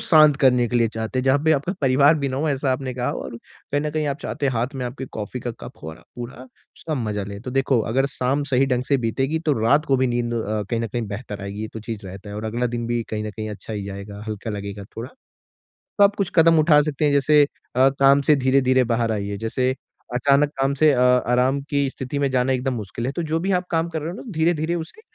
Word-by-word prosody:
शांत 155 Hz, -3 st, +6 dB
करने 125 Hz, -3 st, +4 dB
के 125 Hz, -, 0 dB
लिए 115 Hz, -1 st, +3 dB
चाहते 110 Hz, +3 st, -4 dB
हैं 130 Hz, -, 0 dB
जहाँ 135 Hz, +1 st, +4 dB
पे 160 Hz, -, +5 dB
आपका 150 Hz, +4 st, 0 dB
परिवार 140 Hz, +2 st, +5 dB
भी 140 Hz, -1 st, -1 dB
ना 130 Hz, -, -3 dB
हो, 155 Hz, +3 st, 0 dB
ऐसा 140 Hz, -2 st, 0 dB
आपने 130 Hz, -1 st, -3 dB
कहा, 125 Hz, 0 st, -1 dB
और 115 Hz, -, -6 dB
कहीं 145 Hz, +4 st, -5 dB
न 150 Hz, +1 st, -2 dB
कहीं 155 Hz, 0 st, -1 dB
आप 140 Hz, 0 st, -2 dB
चाहते 140 Hz, -, -2 dB
हैं 135 Hz, -, +1 dB
हाथ 120 Hz, +4 st, -2 dB
में 130 Hz, -, -3 dB
आपके 130 Hz, +2 st, -6 dB
कॉफ़ी 110 Hz, +4 st, -5 dB
का 120 Hz, -, -3 dB
कप -, -, -8 dB
हो 80 Hz, -, -6 dB
और 80 Hz, -, -12 dB
आप 85 Hz, -, -20 dB
पूरा 120 Hz, +1 st, -7 dB, 0.4 s
उसका 160 Hz, -, -3 dB
मज़ा 105 Hz, -6 st, -2 dB
ले। 100 Hz, 0 st, -7 dB
तो 125 Hz, -, -6 dB
देखो, 135 Hz, -1 st, +2 dB
अगर 135 Hz, +3 st, +2 dB
शाम 135 Hz, +3 st, 0 dB
सही 130 Hz, +2 st, +4 dB
ढंग 125 Hz, -2 st, 0 dB
से 140 Hz, -, +4 dB
बीतेगी, 135 Hz, +7 st, 0 dB
तो 160 Hz, -2 st, 0 dB
रात 140 Hz, +8 st, +3 dB
को 135 Hz, -, +3 dB
भी 130 Hz, 0 st, +2 dB
नींद 120 Hz, -1 st, -1 dB
अ, 110 Hz, -2 st, -2 dB
कहीं 115 Hz, -2 st, 0 dB
न 115 Hz, -, -1 dB
कहीं 120 Hz, +3 st, -3 dB
बेहतर 105 Hz, -1 st, -6 dB
आएगी, 100 Hz, +1 st, -6 dB
ये 110 Hz, -, -4 dB
तो 110 Hz, -, -5 dB
चीज़ 110 Hz, -2 st, -6 dB
रहता 95 Hz, +2 st, -9 dB
है, 100 Hz, -, -6 dB
और 105 Hz, -, -5 dB
अगला 120 Hz, +3 st, -1 dB
दिन 120 Hz, -1 st, -3 dB
भी 120 Hz, 0 st, -1 dB
कहीं 105 Hz, 0 st, -3 dB
न 105 Hz, -, -4 dB
कहीं 110 Hz, +1 st, -6 dB
अच्छा 105 Hz, +1 st, -8 dB
ही 105 Hz, -2 st, -4 dB
जाएगा, 100 Hz, +1 st, -8 dB
हल्का 110 Hz, +1 st, -4 dB
लगेगा 100 Hz, -1 st, -6 dB
थोड़ा। 115 Hz, +3 st, -5 dB, 0.9 s
तो 205 Hz, -, +6 dB
आप 200 Hz, 0 st, +4 dB
कुछ 195 Hz, -3 st, -2 dB
कदम 165 Hz, -1 st, +6 dB
उठा 150 Hz, -1 st, +5 dB
सकते 150 Hz, 0 st, -1 dB
हैं, 145 Hz, -, +3 dB
जैसे 145 Hz, +1 st, +5 dB, 0.3 s
अ, 130 Hz, +2 st, +5 dB
काम 140 Hz, +1 st, +4 dB
से 150 Hz, -, +7 dB
धीरे-धीरे 130 Hz, -1 st, +3 dB
बाहर 115 Hz, -1 st, +1 dB
आइए। 100 Hz, -1 st, -3 dB
जैसे 125 Hz, +4 st, -1 dB, 0.4 s
अचानक 140 Hz, +3 st, +3 dB
काम 135 Hz, +1 st, +2 dB
से 155 Hz, -1 st, +6 dB
अ, 125 Hz, -, +1 dB
आराम 125 Hz, +1 st, +3 dB
की 140 Hz, -1 st, +1 dB
स्थिति 130 Hz, +1 st, -5 dB
में 140 Hz, -1 st, +1 dB
जाना 130 Hz, 0 st, +1 dB
एकदम 130 Hz, +1 st, -1 dB
मुश्किल 115 Hz, +1 st, -5 dB
है, 130 Hz, -, -1 dB
तो 170 Hz, -, -3 dB
जो 160 Hz, +1 st, -1 dB
भी 190 Hz, +4 st, -1 dB
आप 180 Hz, -1 st, +1 dB
काम 165 Hz, 0 st, +1 dB
कर 160 Hz, -2 st, -4 dB
रहे 155 Hz, -, -4 dB
हो -, -, -7 dB
ना, -, -, -8 dB
धीरे-धीरे 160 Hz, 0 st, +1 dB
उसे 170 Hz, -, -7 dB
130 Hz, 265 wpm, -22 LUFS, 115-145 Hz, 0.9 s, से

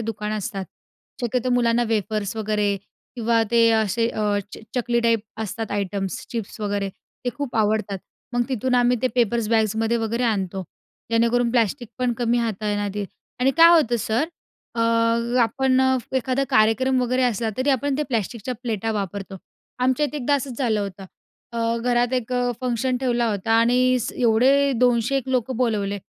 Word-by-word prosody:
दुकानं 215 Hz, -1 st, -3 dB
असतात. 195 Hz, -1 st, -4 dB, 0.6 s
शक्यतो 250 Hz, +1 st, -1 dB
मुलांना 240 Hz, -1 st, +3 dB
वेफर्स 215 Hz, -1 st, -1 dB
वगैरे 210 Hz, -2 st, 0 dB, 0.4 s
किंवा 230 Hz, -1 st, +2 dB
ते 230 Hz, -1 st, +5 dB
असे 220 Hz, +1 st, +1 dB
अ, 210 Hz, -2 st, 0 dB
च -, -, -8 dB, 0.2 s
चकली 240 Hz, -1 st, +1 dB
टाईप 230 Hz, -2 st, +2 dB, 0.2 s
असतात 220 Hz, +1 st, -5 dB
आयटम्स 200 Hz, -1 st, -3 dB
चिप्स 225 Hz, -2 st, -5 dB
वगैरे 200 Hz, -1 st, -1 dB, 0.4 s
ते 245 Hz, -, 0 dB
खूप 280 Hz, -4 st, -4 dB
आवडतात. 210 Hz, -2 st, +1 dB, 0.3 s
मग 245 Hz, 0 st, +2 dB
तिथून 255 Hz, 0 st, 0 dB
आम्ही 245 Hz, 0 st, +3 dB
ते 255 Hz, -, +3 dB
पेपर्स 235 Hz, -2 st, +1 dB
बॅगमध्ये 225 Hz, +1 st, +1 dB
वगैरे 230 Hz, +1 st, -1 dB
आणतो 195 Hz, -4 st, -1 dB, 0.5 s
जेणेकरून 235 Hz, +1 st, +2 dB
प्लास्टिक 240 Hz, 0 st, 0 dB
पण 250 Hz, -1 st, +1 dB
कमी 240 Hz, 0 st, +1 dB
हाताळण्यात 205 Hz, -2 st, -1 dB
येईल 205 Hz, -1 st, -2 dB, 0.3 s
आणि 260 Hz, +2 st, +4 dB
काय 330 Hz, 0 st, +9 dB
होतं 240 Hz, -5 st, 0 dB
सर 225 Hz, +7 st, 0 dB, 0.5 s
अ, 230 Hz, -, -2 dB, 0.6 s
आपण 260 Hz, +2 st, +2 dB, 0.2 s
फ 250 Hz, -, -13 dB
एखादा 260 Hz, +1 st, +1 dB
कार्यक्रम 225 Hz, +5 st, +3 dB
वगैरे 255 Hz, +1 st, +1 dB
असला 230 Hz, -2 st, 0 dB
तरी 265 Hz, +2 st, +1 dB
आपण 270 Hz, +1 st, 0 dB
ते 300 Hz, -, +2 dB
प्लॅस्टिकच्या 235 Hz, 0 st, -2 dB
प्लेटा 225 Hz, -2 st, -2 dB
वापरतो. 195 Hz, -1 st, -4 dB, 0.4 s
आमच्या 260 Hz, +4 st, +2 dB
इथे 300 Hz, -, -6 dB
एकदा 285 Hz, +1 st, +1 dB
असंच 265 Hz, -3 st, -3 dB
झालं 230 Hz, -6 st, +1 dB
होतं. 195 Hz, -1 st, -6 dB, 0.5 s
अ, 230 Hz, 0 st, 0 dB
घरात 245 Hz, 0 st, +1 dB
एक 250 Hz, -1 st, -2 dB
अ, 245 Hz, 0 st, +1 dB
फंक्शन 255 Hz, 0 st, 0 dB
ठेवला 240 Hz, -2 st, +1 dB
होता 210 Hz, +2 st, -1 dB
आणि 250 Hz, +2 st, +3 dB, 0.2 s
एवढे 260 Hz, +4 st, +4 dB
200-1 250 Hz, +2 st, +2 dB
लोकं 255 Hz, -1 st, 0 dB
बोलावले. 210 Hz, -5 st, 0 dB
230 Hz, 160 wpm, -23 LUFS, 215-250 Hz, 0.6 s, काय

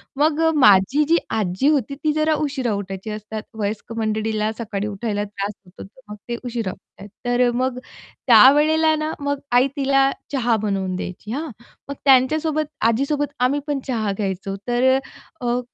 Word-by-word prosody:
मग 300 Hz, +2 st, +2 dB
अ, -, -, +3 dB
माझी 230 Hz, +3 st, +5 dB
जी 335 Hz, -, +5 dB
आजी 205 Hz, +4 st, 0 dB
होती 280 Hz, -3 st, +1 dB
ती 305 Hz, -, +2 dB
जरा 310 Hz, 0 st, +2 dB
उशिरा 260 Hz, -6 st, -2 dB
उठायची 195 Hz, +1 st, -5 dB
असतात 215 Hz, 0 st, -6 dB, 0.2 s
वयस्क 210 Hz, +2 st, -3 dB
मंडळीला 215 Hz, 0 st, -1 dB
सकाळी 210 Hz, -3 st, -3 dB
उठायला 205 Hz, 0 st, -3 dB
त्रास 205 Hz, 0 st, -4 dB
होतो, 180 Hz, -, -12 dB
तर 205 Hz, +7 st, -17 dB
मग 210 Hz, -, -5 dB
ते 235 Hz, -, -1 dB
उशिरा 230 Hz, -6 st, -3 dB
उठतात. 195 Hz, +1 st, -14 dB, 0.2 s
तर 245 Hz, 0 st, +2 dB
मग 250 Hz, +1 st, -1 dB, 0.5 s
त्यावेळेला 300 Hz, +7 st, +6 dB
ना 310 Hz, +1 st, -2 dB
मग 285 Hz, 0 st, -2 dB
आई 250 Hz, +2 st, +5 dB
तिला 275 Hz, -1 st, +3 dB, 0.2 s
चहा 245 Hz, -4 st, +1 dB
बनवून 195 Hz, -3 st, -2 dB
द्यायची 185 Hz, +4 st, -6 dB
हां. 300 Hz, +4 st, -3 dB, 0.4 s
मग 280 Hz, -, -2 dB
त्यांच्यासोबत 305 Hz, +4 st, +3 dB, 0.2 s
आजीसोबत 280 Hz, +5 st, 0 dB
आम्ही 255 Hz, +4 st, +2 dB
पण 285 Hz, -2 st, -1 dB
चहा 220 Hz, -5 st, -1 dB
घ्यायचो, 195 Hz, -1 st, -3 dB
तर 240 Hz, +1 st, +1 dB, 0.6 s
अ, 245 Hz, 0 st, 0 dB
240 Hz, 160 wpm, -21 LUFS, 210-280 Hz, 0.6 s, त्यावेळेला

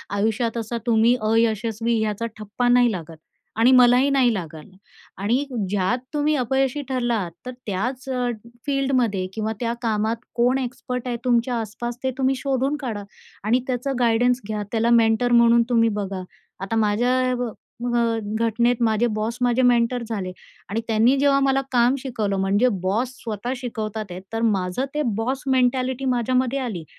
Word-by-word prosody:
आयुष्यात 225 Hz, +3 st, 0 dB
असा 230 Hz, +1 st, -3 dB
तुम्ही 230 Hz, +1 st, +4 dB, 0.2 s
अयशस्वी 225 Hz, 0 st, +1 dB
ह्याचा 215 Hz, +1 st, -2 dB
ठप्पा 215 Hz, +3 st, -2 dB
नाही 245 Hz, -1 st, +5 dB
लागत 165 Hz, -4 st, -7 dB, 0.4 s
आणि 235 Hz, +3 st, +6 dB
मलाही 250 Hz, +1 st, +6 dB
नाही 260 Hz, -4 st, +3 dB
लागल. 160 Hz, -6 st, -6 dB, 0.5 s
आणि, 235 Hz, +8 st, 0 dB, 0.2 s
ज्यात 205 Hz, +5 st, 0 dB
तुम्ही 300 Hz, +1 st, +1 dB
अपयशी 265 Hz, +2 st, 0 dB
ठरलात, 240 Hz, -8 st, -1 dB
तर 255 Hz, -, -4 dB
त्याच 245 Hz, +7 st, -3 dB
अ, 250 Hz, -1 st, 0 dB, 0.4 s
फील्डमध्ये 255 Hz, -8 st, +1 dB
किंवा 220 Hz, +1 st, -2 dB
त्या 235 Hz, -1 st, -1 dB
कामात 220 Hz, -1 st, 0 dB, 0.2 s
कोण 245 Hz, +2 st, +3 dB
एक्सपर्ट 250 Hz, 0 st, -4 dB
आहे 240 Hz, -1 st, -2 dB
तुमच्या 245 Hz, 0 st, +2 dB
आस-पास, 235 Hz, +2 st, -5 dB
ते 260 Hz, -, +1 dB
तुम्ही 265 Hz, 0 st, +2 dB
शोधून 270 Hz, +1 st, -1 dB
काढा 220 Hz, -6 st, -4 dB, 0.4 s
आणि 225 Hz, +4 st, +2 dB
त्याचं 260 Hz, +2 st, -2 dB
गाईडन्स 245 Hz, +1 st, +2 dB
घ्या. 210 Hz, -1 st, -3 dB
त्याला 230 Hz, 0 st, +1 dB
मेंटर 225 Hz, +2 st, +2 dB
म्हणून 235 Hz, 0 st, +5 dB
तुम्ही 230 Hz, -2 st, +3 dB
बघा. 195 Hz, -1 st, -4 dB, 0.4 s
आता 195 Hz, +3 st, -3 dB
माझ्या 245 Hz, +4 st, +2 dB
ब 245 Hz, -2 st, -2 dB, 0.3 s
ब 240 Hz, 0 st, -1 dB, 0.4 s
घटनेत 235 Hz, +2 st, +2 dB
माझे 220 Hz, +1 st, +2 dB
बॉस 220 Hz, +2 st, -2 dB
माझे 245 Hz, +1 st, +2 dB
मेंटर 245 Hz, 0 st, +2 dB
झाले 195 Hz, -5 st, -3 dB, 0.4 s
आणि 220 Hz, +4 st, -1 dB
त्यांनी 225 Hz, +4 st, +3 dB
जेव्हा 280 Hz, 0 st, +4 dB
मला 270 Hz, 0 st, +2 dB
काम 245 Hz, +1 st, +3 dB
शिकवलं, 220 Hz, -7 st, -2 dB
म्हणजे 200 Hz, +5 st, +2 dB, 0.2 s
बॉस 215 Hz, +7 st, 0 dB
स्वतः 225 Hz, +2 st, -4 dB
शिकवतात 220 Hz, -4 st, -4 dB
आहेत, 180 Hz, +1 st, -7 dB
तर 225 Hz, -, -1 dB
माझं 200 Hz, +1 st, 0 dB
ते 300 Hz, -, 0 dB
बॉस 255 Hz, +5 st, -2 dB
मेंटॅलिटी 255 Hz, +1 st, +1 dB
माझ्यामध्ये 255 Hz, +2 st, 0 dB
आली 220 Hz, -10 st, -4 dB
235 Hz, 155 wpm, -23 LUFS, 220-255 Hz, 0.5 s, आणि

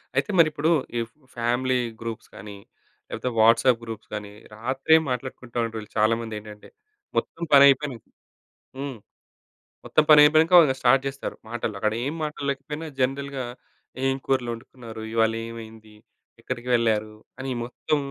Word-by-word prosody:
అయితే -, -, +1 dB
మరి 165 Hz, -, +7 dB
ఇప్పుడు 155 Hz, +2 st, 0 dB, 0.3 s
ఈ -, -, +1 dB, 0.4 s
ఫ్యామిలీ 125 Hz, +2 st, +1 dB, 0.2 s
గ్రూప్స్ 115 Hz, -1 st, -6 dB
గాని, 100 Hz, 0 st, -9 dB, 0.5 s
లేకపోతే 125 Hz, -, -3 dB
వాట్సాప్ 115 Hz, +2 st, +5 dB
గ్రూప్స్ 115 Hz, -2 st, -8 dB
గాని, 105 Hz, -1 st, -5 dB, 0.2 s
రాత్రే 135 Hz, +7 st, +3 dB
మాట్లాడుకుంటూ 125 Hz, -1 st, -5 dB
ఉండేవాళ్ళు 110 Hz, -2 st, -7 dB
చాలా 110 Hz, +1 st, +4 dB
మంది 110 Hz, -2 st, -6 dB
ఏంటంటే, 105 Hz, 0 st, -13 dB, 0.5 s
మొత్తం 170 Hz, -, -2 dB
పనైపోయినంక 140 Hz, -3 st, +5 dB, 0.7 s
హ్మ్. 135 Hz, -2 st, -5 dB, 0.9 s
మొత్తం 155 Hz, -, +3 dB
పని 150 Hz, -1 st, +9 dB
అయిపోయినాక 160 Hz, +4 st, +5 dB
ఇంక 130 Hz, -, +1 dB
స్టార్ట్ 130 Hz, +2 st, +4 dB
జేస్తారు 135 Hz, 0 st, -4 dB
మాటలు. 115 Hz, -2 st, -3 dB
అక్కడ 110 Hz, +1 st, 0 dB
ఏం 145 Hz, -, -2 dB
మాటలు 150 Hz, -2 st, -4 dB
లేకపోయినా 150 Hz, +4 st, -4 dB
జనరల్‌గా 135 Hz, 0 st, -1 dB, 0.6 s
ఏం 135 Hz, 0 st, +2 dB
కూరలు 130 Hz, -3 st, 0 dB
వండుకున్నారు. 115 Hz, -1 st, -10 dB
ఇవాళ 115 Hz, -1 st, +3 dB, 0.2 s
ఏమైంది? 110 Hz, -2 st, -11 dB, 0.5 s
ఎక్కడికి 125 Hz, -1 st, -5 dB
వెళ్లారు? 110 Hz, -2 st, 0 dB, 0.2 s
అని 130 Hz, 0 st, -4 dB
మొత్తం 125 Hz, +5 st, -2 dB
125 Hz, 135 wpm, -25 LUFS, 110-140 Hz, 0.9 s, పని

